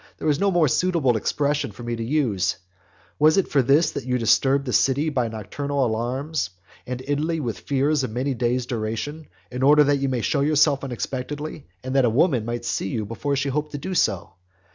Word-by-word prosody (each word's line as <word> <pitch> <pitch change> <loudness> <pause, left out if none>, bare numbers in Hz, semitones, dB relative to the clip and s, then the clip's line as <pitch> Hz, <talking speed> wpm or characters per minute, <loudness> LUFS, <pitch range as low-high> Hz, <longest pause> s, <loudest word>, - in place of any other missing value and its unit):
there - - -4
is 145 0 +1
no 200 - +3
more 175 -4 +3
suitable 160 -5 +2
expression 145 +4 -1
for 115 +4 -11
me 120 0 -3
to 115 - -4
use,) 115 -9 0 0.6
was 155 +3 +5
it 195 - +2
for 140 - +2
this 145 +5 +3
that - - -5
you 125 0 0
disturbed 135 +4 +2
the 125 - -3
city 140 +4 +2
by 125 -5 0
nocturnal 135 +6 -2
alarms, 125 - -2 0.4
and 125 0 -5
Italy 155 +4 -1
with 120 -7 -4
fears 140 +1 0
of 130 - -2
many 130 +5 -2
days' 125 0 0
duration, 120 +7 -4 0.2
in 125 +1 -4
order 150 +2 +6
that 145 0 +2
you 135 0 0
might 125 -3 -1
show 140 - +1
yourself 145 -1 +3
unexpectedly, 135 +5 -5 0.2
and 130 +1 -4
that 135 - +4
a 120 - +4
woman 125 -1 +2
might 120 +1 -4
see 105 - -1
you 110 +1 -3
before 130 +7 -2
she 140 +1 -1
hoped 150 +2 -2
to - - -3
do 185 +7 -5
so? 100 - 0
135 Hz, 210 wpm, -23 LUFS, 120-150 Hz, 0.6 s, order